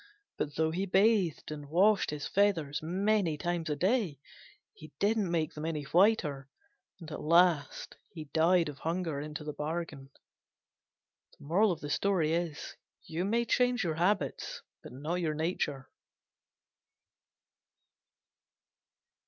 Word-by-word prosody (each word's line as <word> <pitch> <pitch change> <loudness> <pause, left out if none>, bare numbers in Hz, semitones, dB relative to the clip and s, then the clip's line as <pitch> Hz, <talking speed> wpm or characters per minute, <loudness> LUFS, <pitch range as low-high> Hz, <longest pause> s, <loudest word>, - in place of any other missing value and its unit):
But 145 - -3
though 160 0 +1
he 190 +4 -2
bathed 190 -5 +2
and 145 -2 -7
washed 195 +6 +3
his 150 -1 -4
feathers 165 -8 +1
many 185 0 +1
times 175 -1 -2
a 150 - 0
day, 185 - +1 0.6
he 155 -1 -13
didn't 210 -2 +1
make 165 -2 -1
them 150 - -7
any 160 -2 -2
whiter, 150 -5 +2 0.5
and 165 -3 -10
at 150 - -6
last 170 -3 +2 0.4
died 170 +1 +4
of 145 -2 -7
hunger 165 -3 -2
into 150 0 -6
the 150 0 -5
bargain. 150 -2 -5 1.3
You 170 -1 -1
may 235 +4 +1
change 245 0 +2
your 165 -3 -1
habits, 190 +4 -1 0.2
but - - -11
not 155 +8 -3
your 155 -3 -1
nature. 150 -4 -2
165 Hz, 110 wpm, -31 LUFS, 150-190 Hz, 1.3 s, died